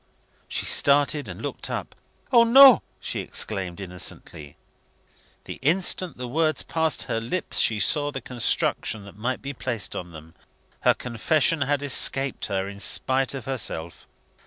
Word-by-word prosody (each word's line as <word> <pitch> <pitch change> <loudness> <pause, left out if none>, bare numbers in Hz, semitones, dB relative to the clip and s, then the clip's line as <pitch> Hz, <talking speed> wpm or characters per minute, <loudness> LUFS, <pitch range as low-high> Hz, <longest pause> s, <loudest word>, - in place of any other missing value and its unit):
She - - -3
started, 145 +1 +3
and - - -9
looked - - -5
up. - - -5 0.4
"O, 235 -2 +6
no!" 260 +1 +8 0.2
she - - -5
exclaimed 95 -4 -3
innocently. 90 -5 -6 0.9
The - - -9
instant 175 +4 0
the 125 0 -6
words 155 +4 0
passed 160 -3 -1
her 115 - -3
lips, 165 +10 -3
she 110 -2 +2
saw 145 +5 +1
the 135 - -5
construction 115 -3 -2
that 100 - -13
might 120 +5 -4
be 140 +1 -5
placed 120 -5 -4
on 90 - -6
them. 80 0 -13 0.5
Her - - +3
confession 145 +6 0
had 140 +1 0
escaped 135 -1 +3
her 95 0 -2
in 100 0 -9
spite 130 +4 0
of 130 -4 -7
herself. 95 -11 -4
130 Hz, 150 wpm, -24 LUFS, 100-150 Hz, 0.9 s, no